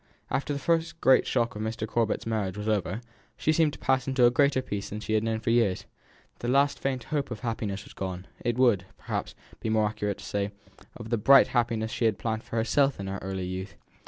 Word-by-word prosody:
After 140 - -1
the 145 - -1
first 165 +2 0
great 130 - +5
shock 120 -3 0
of 105 - -5
Mr. 110 0 -3
Corbet's 115 0 0
marriage 105 -4 -2
was 105 +1 -4
over, 105 0 0 0.4
she 155 - +2
seemed 155 -1 +3
to - - -8
pass 130 -1 +1
into 130 -2 +4
a 120 - +6
greater 140 0 +3
peace 100 -4 -4
than 105 - -5
she 110 - -3
had 110 - +3
known 110 0 -1
for 115 - 0
years; 115 -6 +2 0.5
the 120 - -4
last 140 +3 +3
faint 130 -3 -2
hope 145 -2 0
of 120 -4 -6
happiness 110 -4 -3
was - - -14
gone; 95 -1 -5 0.2
it 120 -1 0
would, 115 -8 +3
perhaps, - - -4 0.2
be - - -3
more 110 -1 +3
accurate 105 -1 -2
to 100 - -11
say, 100 0 -1 0.5
of 115 -1 -9
the 115 - +2
bright 135 +5 +7
happiness 115 -2 0
she 115 - -1
had 110 -3 +2
planned 110 -1 -2
for - - -7
herself 135 +4 +2
in 100 - -4
her 95 0 -4
early 95 -1 -3
youth. 95 +2 -5
115 Hz, 230 wpm, -28 LUFS, 105-130 Hz, 0.5 s, bright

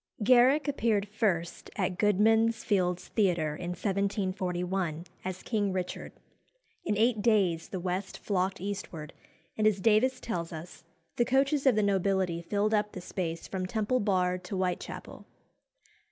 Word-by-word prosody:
Garrick 255 +6 +5
appeared 225 -7 +1
first 195 -6 -1
at 185 -2 -1
Goodman's 220 +2 +3
Fields 180 -3 0
Theatre, 175 -8 +1
in 175 +2 -5
1741, 185 -3 -1 0.2
as 185 0 -5
King 205 -4 0
Richard. 185 -1 -4 0.7
In 210 - -1
eight 225 0 +2
days 195 -7 +2
the 190 - -4
west 185 +2 -3
flocked 190 -1 -1
eastward, 185 -6 -5 0.5
and, 215 - +4
as 205 -2 +2
Davies 230 +6 +3
tells 170 -9 -4
us, 165 +2 -9 0.3
"the 240 - +4
coaches 275 +3 +2
of 255 - +5
the 215 - +2
nobility 190 -3 +1
filled 205 +5 0
up 210 -1 +1
the - - -6
space 170 -2 -4
from 185 -1 -3
Temple 220 +5 0
Bar 185 -3 +1
to 195 - -6
Whitechapel." 185 -1 -4
195 Hz, 140 wpm, -29 LUFS, 180-215 Hz, 0.7 s, Garrick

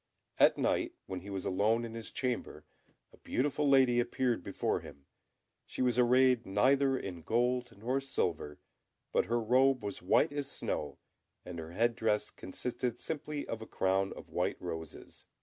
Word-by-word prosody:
At - - +6
night, - - 0
when 95 -1 -5
he 95 +3 -10
was 95 -2 -4
alone 110 +5 +2
in 115 - -7
his 115 -1 -6
chamber, 125 -2 -3 0.5
a - - -17
beautiful 145 +2 0
lady 130 -3 +5
appeared 120 -4 0
before - - -1
him; 70 -1 -13 0.6
she - - -2
was 125 -1 +2
arrayed 125 0 +5
neither 135 +7 +3
in 90 -7 -6
gold 120 +5 0
nor 120 +6 -1
in - - -1
silver, 85 - -2 0.5
but - - +2
her 120 +1 +1
robe 130 +2 +3
was 100 -1 -5
white 95 +9 +3
as 145 -1 -3
snow, 75 -3 -3 0.5
and 90 -2 -6
her 80 +1 -8
head 115 +4 +2
dress 110 -3 0
consisted 120 +4 -4
simply 150 -1 -4
of 115 - -4
a 110 - -8
crown 95 +1 +1
of - - -12
white - - -1
roses. 80 -3 -8
115 Hz, 165 wpm, -32 LUFS, 95-130 Hz, 0.6 s, At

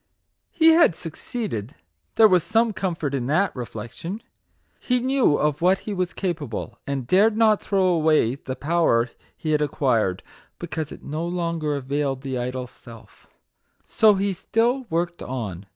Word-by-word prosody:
He 325 -1 +4
had 325 - +5
succeeded, 165 - -5 0.4
there 220 - +7
was 180 -3 +4
some 225 +5 +1
comfort 170 -7 -3
in 125 -3 -2
that 180 +8 +1
reflection. 125 - -7 0.6
He 250 -1 0
knew 255 - +2
of 150 0 0
what 185 +2 +4
he 210 - -3
was 185 -2 -1
capable, 145 - -4
and 140 -3 -2
dared 210 - +3
not 220 -2 +4
throw 195 -2 +1
away 155 -8 +3
the 130 -1 -6
power 135 -6 +1 0.3
he 155 - -3
had 150 -1 +2
acquired, 115 -10 0 0.3
because 160 -3 -5
it - - -11
no 155 +3 -4
longer 170 -4 -2
availed 140 0 -2
the 130 -2 -3
idol 125 +1 -3
Self. 115 -3 -16 0.6
So 215 -2 +4
he 195 0 0
still 240 +7 0
worked 170 +1 -2
on. 105 -8 -5
160 Hz, 150 wpm, -23 LUFS, 130-195 Hz, 0.6 s, there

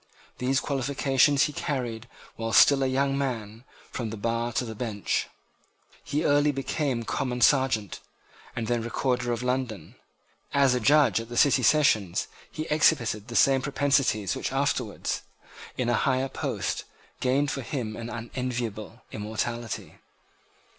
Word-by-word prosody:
These 130 +1 +1
qualifications 135 0 +2
he 150 - -1
carried, 120 -6 -3 0.3
while 115 0 -4
still 140 -1 +6
a 135 - +2
young 135 +1 +1
man, 115 -4 -4 0.3
from 120 -3 -3
the 110 - -6
bar 115 +2 -1
to 125 - 0
the 110 - -6
bench. 110 -3 -2 0.8
He 150 - -1
early 145 +1 +4
became 135 -2 -2
Common 125 +1 -2
Serjeant, 120 - +2 0.6
and 115 - -2
then 120 0 0
Recorder 125 +1 -1
of 120 +1 -2
London. 125 -8 -2 0.6
As 140 -2 +5
a 125 - +1
judge 130 -3 +4
at 115 0 -8
the 120 - -6
City 145 - +5
sessions 110 - +3 0.2
he 155 - -4
exhibited 120 -9 +2
the 120 - -7
same 135 +1 +4
propensities 135 -7 +1
which - - -3
afterwards, - - -1 0.6
in 125 - -1
a 120 - +2
higher 130 +3 +1
post, - - -3 0.4
gained 135 +3 +1
for 135 - -3
him 120 -4 -4
an 115 +1 -6
unenviable 120 -2 -5
immortality. 110 +2 -4
125 Hz, 140 wpm, -27 LUFS, 115-135 Hz, 0.8 s, still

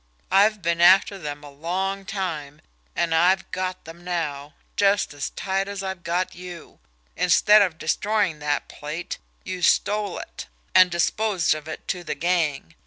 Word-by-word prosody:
I've 205 0 +4
been 170 0 0
after 190 +2 +6
them 145 -3 -6
a 145 - -10
long 190 +6 -3
time, 160 -7 -4 0.3
and 170 -1 0
I've 180 +4 +3
got 185 0 -3
them 165 +2 -11
now, 150 -5 -3 0.2
just 200 -5 +2
as 145 -1 -4
tight 195 0 -2
as 200 -1 -5
I've 190 -2 -4
got 175 +2 -1
you. 175 -2 -10 0.4
Instead 205 +4 +5
of 180 -5 +1
destroying 195 +1 0
that 145 -1 -1
plate, 155 +4 -6 0.2
you 185 -1 -5
stole 205 +2 +2
it, - - -8 0.3
and 185 -1 +7
disposed 180 +2 +1
of 155 0 -7
it - - -8
to 180 -2 -2
the 155 - -3
gang. 155 - 0
175 Hz, 160 wpm, -24 LUFS, 160-195 Hz, 0.4 s, and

